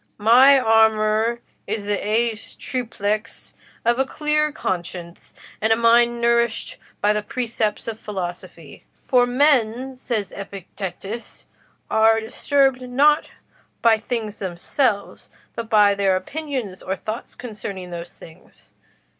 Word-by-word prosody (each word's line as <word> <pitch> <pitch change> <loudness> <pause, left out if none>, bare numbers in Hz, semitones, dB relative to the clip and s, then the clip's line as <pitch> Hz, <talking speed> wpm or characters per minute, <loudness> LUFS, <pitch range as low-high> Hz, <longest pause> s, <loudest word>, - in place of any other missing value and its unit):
My 250 +6 +7
armour 220 0 +3 0.3
is 205 0 -3
the 205 - 0
aes 220 +1 -1
triplex 220 -3 -4 0.3
of 240 +2 +2
a - - +4
clear 300 +2 0
conscience, 175 - -5 0.3
and 220 +1 +2
a - - +6
mind 235 +1 +4
nourished 235 -1 +1 0.2
by 210 +1 +3
the 210 - -1
precepts 225 -1 -3
of 225 -1 -5
philosophy. 180 -4 -7 0.2
'For 245 -1 +4
men,' 255 -1 +2
says 220 -6 -3
Epictetus, 200 +2 -7 0.5
'are 225 0 +4
disturbed 265 +3 +1
not 280 +5 +3 0.6
by 225 -2 +5
things 220 -2 -4
themselves, 200 +4 -2 0.3
but 230 -1 -5
by 205 -2 +5
their 195 -1 +2
opinions 250 - -4
or 190 - -3
thoughts 215 +4 -6
concerning 205 -6 -7
those 170 0 -8
things. 160 - -17
225 Hz, 120 wpm, -22 LUFS, 205-245 Hz, 0.6 s, My